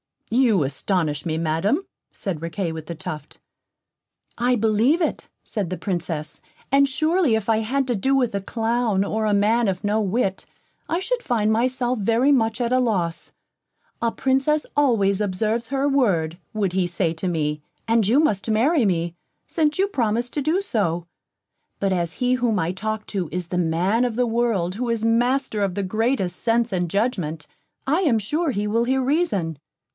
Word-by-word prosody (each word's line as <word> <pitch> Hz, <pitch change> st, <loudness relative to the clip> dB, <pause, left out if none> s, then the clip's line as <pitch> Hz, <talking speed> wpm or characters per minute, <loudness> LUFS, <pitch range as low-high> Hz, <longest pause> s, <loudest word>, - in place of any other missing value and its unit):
"You 230 Hz, -, +3 dB
astonish 150 Hz, +1 st, -1 dB
me, 160 Hz, -1 st, -1 dB
Madam," 165 Hz, -, 0 dB, 0.3 s
said 180 Hz, -7 st, -5 dB
Riquet 165 Hz, +1 st, -3 dB
with 160 Hz, -1 st, -7 dB
the 170 Hz, -, -5 dB
Tuft. 150 Hz, -1 st, -7 dB, 1.0 s
"I 245 Hz, +1 st, +2 dB
believe 225 Hz, -, +2 dB
it," 320 Hz, -, -2 dB
said 205 Hz, -6 st, -3 dB
the 185 Hz, -, -3 dB
Princess, 165 Hz, -5 st, -4 dB, 0.3 s
"and 280 Hz, 0 st, +5 dB
surely 310 Hz, -1 st, +2 dB
if 220 Hz, 0 st, -2 dB
I 225 Hz, -, +4 dB
had 260 Hz, +5 st, 0 dB
to 245 Hz, -, 0 dB
do 265 Hz, +7 st, +1 dB
with 250 Hz, -5 st, +1 dB
a 200 Hz, -, 0 dB
clown, 225 Hz, -1 st, 0 dB
or 220 Hz, +2 st, -1 dB
a 210 Hz, -, +2 dB
man 220 Hz, +3 st, +3 dB
of 185 Hz, -2 st, -2 dB
no 210 Hz, +1 st, +1 dB
wit, 200 Hz, -1 st, -1 dB, 0.4 s
I 335 Hz, -, 0 dB
should 480 Hz, +6 st, -1 dB
find 220 Hz, -, +1 dB
myself 250 Hz, +1 st, +1 dB
very 230 Hz, +7 st, +3 dB
much 225 Hz, -4 st, +2 dB
at 235 Hz, 0 st, 0 dB
a 255 Hz, -, +4 dB
loss. 185 Hz, -9 st, -1 dB, 0.7 s
'A 230 Hz, -1 st, 0 dB
Princess 270 Hz, +3 st, +1 dB
always 215 Hz, -8 st, +2 dB
observes 215 Hz, +4 st, -1 dB
her 275 Hz, +2 st, 0 dB
word,' 185 Hz, -, +1 dB
would 205 Hz, -4 st, 0 dB
he 185 Hz, -1 st, +1 dB
say 175 Hz, -1 st, 0 dB
to 175 Hz, +4 st, -3 dB
me, 150 Hz, -3 st, -1 dB, 0.3 s
'and 225 Hz, -3 st, +3 dB
you 245 Hz, +7 st, +4 dB
must 225 Hz, -9 st, +1 dB
marry 245 Hz, +5 st, +3 dB
me, 170 Hz, -3 st, 0 dB, 0.3 s
since 305 Hz, -2 st, 0 dB
you 385 Hz, -, +3 dB
promised 240 Hz, -, -1 dB
to 295 Hz, -, 0 dB
do 320 Hz, +7 st, +1 dB
so.' 175 Hz, -, -1 dB, 0.7 s
But 195 Hz, -1 st, +1 dB
as 170 Hz, -2 st, -1 dB
he 250 Hz, 0 st, +1 dB
whom 240 Hz, -4 st, +1 dB
I 165 Hz, -1 st, 0 dB
talk 215 Hz, +3 st, -4 dB
to 190 Hz, -5 st, -2 dB
is 180 Hz, 0 st, -4 dB
the 180 Hz, -, -2 dB
man 180 Hz, +8 st, +1 dB
of 240 Hz, -3 st, -2 dB
the 250 Hz, +1 st, +2 dB
world 225 Hz, -6 st, 0 dB
who 240 Hz, +2 st, -2 dB
is 230 Hz, -1 st, 0 dB
master 240 Hz, 0 st, +1 dB
of 195 Hz, -3 st, 0 dB
the 200 Hz, -, -1 dB
greatest 215 Hz, -2 st, 0 dB
sense 235 Hz, 0 st, +1 dB
and 175 Hz, -2 st, -1 dB
judgment, 175 Hz, -7 st, -1 dB, 0.4 s
I 295 Hz, +6 st, +2 dB
am 280 Hz, -11 st, +3 dB
sure 300 Hz, -, -1 dB
he 205 Hz, -3 st, -2 dB
will 230 Hz, +3 st, +1 dB
hear 265 Hz, +2 st, +1 dB
reason. 230 Hz, -, 0 dB
220 Hz, 180 wpm, -23 LUFS, 185-250 Hz, 1.0 s, and